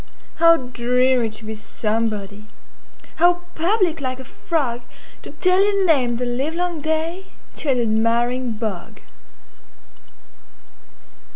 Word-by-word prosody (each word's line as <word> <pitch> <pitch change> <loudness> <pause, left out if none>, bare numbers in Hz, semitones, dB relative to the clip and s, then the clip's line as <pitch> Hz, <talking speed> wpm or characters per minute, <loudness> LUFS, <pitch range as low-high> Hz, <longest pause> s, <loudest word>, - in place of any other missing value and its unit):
How 335 0 +6
dreary 250 -1 +1
to 215 0 -11
be 220 - -5
somebody! 215 -1 -3 0.7
How 350 +1 +4
public, 345 -2 +1
like 255 -1 -3
a - - -7
frogTo 250 -4 -5
tell 365 +1 +4
your 400 -1 +2
name 260 -8 +3
the 250 +1 -2
livelong 315 +7 -2
dayTo 320 0 -4
an 255 -2 +2
admiring 235 +2 +1
bog! 215 -5 -5
255 Hz, 100 wpm, -21 LUFS, 230-330 Hz, 0.7 s, How